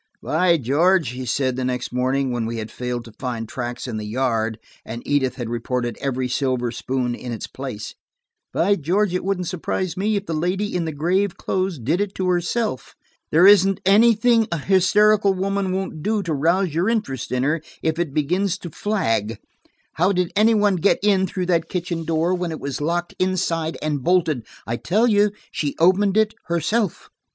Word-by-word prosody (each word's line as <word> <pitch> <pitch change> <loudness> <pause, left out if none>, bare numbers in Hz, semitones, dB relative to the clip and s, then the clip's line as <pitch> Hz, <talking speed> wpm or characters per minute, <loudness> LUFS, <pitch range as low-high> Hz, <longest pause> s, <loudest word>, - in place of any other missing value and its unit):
"By 170 +2 +3
George," 160 +4 +2
he 125 +1 -6
said 130 0 0
the 130 - -2
next 125 -1 -3
morning 130 +1 0
when 120 -2 -2
we 115 0 -4
had 110 0 -5
failed 125 -1 -4
to 115 - -11
find 120 -4 -4
tracks 120 +1 -5
in 115 -3 -4
the 105 - -4
yard, 115 -2 -1 0.3
and 115 +1 -7
Edith 130 -3 +1
had 120 -3 -5
reported 120 0 -2
every 130 -2 -1
silver 125 -2 -1
spoon 125 +1 -2
in 120 0 -6
its 115 - -4
place, 130 -6 -7 0.6
"by 200 +4 +2
George, 185 +5 +1
it 180 - -1
wouldn't 190 -1 -1
surprise 180 0 -3
me 210 +3 0
if 200 0 -2
the 165 - -3
lady 180 +6 -1
in 175 -2 0
the 160 - -2
grave 175 +6 0
clothes 185 -2 -1
did 150 - 0
it 205 -1 -3
to 185 -1 -1
herself. 180 - -1 0.4
There 165 +4 +6
isn't 195 -1 +6
anything 225 +2 +5
a 170 - 0
hysterical 200 +4 +3
woman 195 0 -1
won't 190 -4 -3
do 210 +3 0
to 170 -4 -2
rouse 170 +4 +1
your 175 +7 +1
interest 135 - -2
in 125 0 0
her, 150 +3 +1 0.2
if 160 +1 0
it 170 -4 -1
begins 180 +7 0
to 175 -3 -9
flag. 115 - -1 0.6
How 180 +4 +3
did 180 -2 0
any 220 +2 +4
one 205 -3 +3
get 190 +4 +3
in 195 -2 +3
through 185 +1 -3
that 170 -2 +1
kitchen 170 -2 -3
door, 165 +2 +1
when 180 -2 -2
it 160 - -5
was 140 +1 -4
locked 170 +3 -1
inside 170 -3 0
and 150 -3 -1
bolted? 165 -9 +1 0.2
I 115 +3 -2
tell 210 - +1
you, 210 -3 +4 0.2
she 145 -2 -2
opened 190 +4 +3
it 220 0 +3
herself." 170 +4 -1
170 Hz, 190 wpm, -22 LUFS, 130-190 Hz, 0.6 s, There